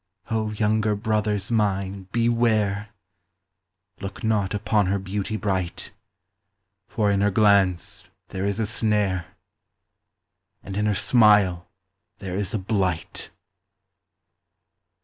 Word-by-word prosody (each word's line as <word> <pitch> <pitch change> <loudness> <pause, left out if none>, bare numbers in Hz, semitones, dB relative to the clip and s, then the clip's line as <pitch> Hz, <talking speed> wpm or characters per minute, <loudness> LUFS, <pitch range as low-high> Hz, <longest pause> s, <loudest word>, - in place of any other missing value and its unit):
O, 110 -1 0
younger 110 0 +1
brothers 105 -1 -1
mine, 100 -3 -1
beware! 110 -3 +1 1.1
Look 95 0 -7
not 105 -3 0
upon 105 -1 +1
her 100 +2 +1
beauty 100 +2 -3
bright; 95 -4 -2 1.0
For 105 -2 0
in 100 0 +1
her 105 - +3
glance 100 -3 +2 0.2
there 95 - -4
is 100 +1 -1
a 110 - +1
snare, 105 -5 0 1.3
And 95 - -7
in 105 +1 0
her 105 - +1
smile 100 -5 +4 0.5
there 95 -2 -6
is 100 -2 -2
a - - -1
blight. 95 -4 -2
105 Hz, 110 wpm, -24 LUFS, 95-110 Hz, 1.3 s, smile